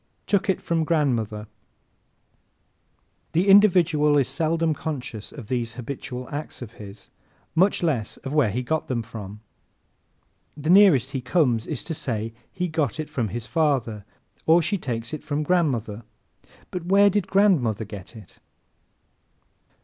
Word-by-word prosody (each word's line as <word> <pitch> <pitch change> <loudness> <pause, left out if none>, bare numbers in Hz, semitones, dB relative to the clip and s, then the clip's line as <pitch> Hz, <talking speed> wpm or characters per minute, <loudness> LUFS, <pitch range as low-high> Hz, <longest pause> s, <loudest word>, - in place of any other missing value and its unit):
"Took 200 0 +1
It" 190 - +2
From 165 -1 0
Grandmother 120 -10 0 1.8
¶ - - -42
The 175 +5 +2
individual 170 -7 +5
is 135 - +2
seldom 160 +3 0
conscious 135 -8 -5
of 135 -7 -9
these 120 0 -2
habitual 125 0 -6
acts 145 -3 -6
of 110 - -10
his, 100 0 -11 0.4
much 185 +3 +3
less 130 -10 -1
of 135 - -4
where 145 -7 +3
he 125 +5 -2
got 160 +5 -1
them. 120 -3 -2 1.5
The 155 +3 0
nearest 180 - +6
he 135 -2 -3
comes 125 -4 +1
is 150 - -3
to 165 - -4
say 115 -6 -3 0.2
he 180 -1 -2
"got 155 -2 -1
it 155 - -4
from 120 -4 -1
his 110 +3 -5
father" 130 -9 0 0.4
or 165 +2 +5
"she 200 +2 -1
takes 115 -3 -4
it 155 - -5
from 150 0 -2
grandmother." 130 - 0 0.7
But 175 -2 -5
where 200 +2 +5
did 205 -1 0
grandmother 145 - +2
get 100 +1 -10
it? 105 -5 -14
145 Hz, 145 wpm, -24 LUFS, 115-165 Hz, 1.8 s, nearest